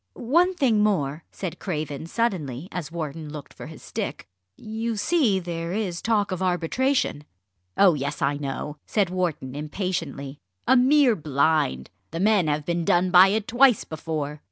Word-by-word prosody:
"One 345 +10 +2
thing 245 -10 +2
more," 160 -7 0
said 185 -4 -6
Craven 155 -4 -4
suddenly, 170 - -2
as 165 -4 -5
Wharton 160 -2 -5
looked 150 -2 -9
for - - -9
his - - -12
stick - - -5 0.3
"you 225 +1 -4
see 245 - +2
there 170 -1 -4
is 190 -5 -2
talk 210 -3 +1
of 185 -1 -3
arbitration." 185 - 0 0.5
"Oh 190 -3 +6
yes, 145 0 -3
I 145 +1 +1
know!" 145 +1 -5
said 200 -5 +1
Wharton 170 -8 -2
impatiently; 150 -3 -4 0.3
"a - - +6
mere 260 -1 +5
blind. 145 - 0 0.2
The 165 - -5
men 200 -3 +3
have 150 0 -1
been 170 0 -1
done 180 +2 +2
by 185 +1 +8
it 210 +2 -1
twice 250 -1 +4
before. 155 -2 -4
175 Hz, 155 wpm, -25 LUFS, 150-215 Hz, 0.5 s, by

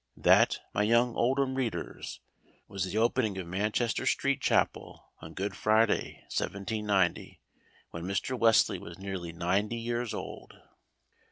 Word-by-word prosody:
That, - - +5 0.2
my 105 - +1
young 115 +3 +3
Oldham 130 +2 +1
readers, 130 -4 -4 0.5
was 95 -2 -3
the 95 +3 -4
opening 110 -3 +1
of 95 - -4
Manchester 105 +7 -1
St. 140 +1 +1
Chapel - - -1
on - - -11
Good 100 +2 -3
Friday, 110 +1 +1
1790, 100 -2 -1 0.5
when 85 +1 -6
Mr. 100 +7 -1
Wesley 115 -2 +4
was 85 0 -10
nearly 95 -3 -5
ninety 95 +7 0
years 120 0 -2
old. - - -7
105 Hz, 125 wpm, -29 LUFS, 95-120 Hz, 0.5 s, That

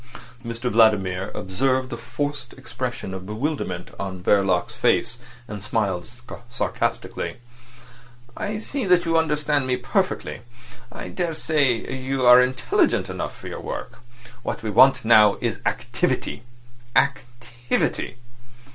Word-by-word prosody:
Mr 115 +1 -3
Vladimir 100 -4 +3
observed 130 +7 0
the - - -2
forced 145 +2 -4
expression 95 - -5
of 95 0 -7
bewilderment 105 - -3
on 95 -2 -5
Verloc's 95 -3 +2
face, 115 - +1 0.3
and 105 -2 -6
smiled 100 -4 -1 0.4
sarcastically. 125 - -2 1.0
"I 210 +1 -3
see 250 +3 -4
that 180 -2 +4
you 165 0 +1
understand 150 -3 +1
me 125 -1 +1
perfectly. 185 - -1 0.5
I - - -7
daresay 150 -8 0
you 130 0 -1
are 125 +1 +9
intelligent 125 0 +1
enough - - -5
for - - -10
your - - -6
work. - - -6 0.4
What - - -4
we 110 - -2
want 130 +3 +6
now 110 -3 +6
is - - -2
activity—activity." 120 0 -2
120 Hz, 115 wpm, -23 LUFS, 105-140 Hz, 1.0 s, are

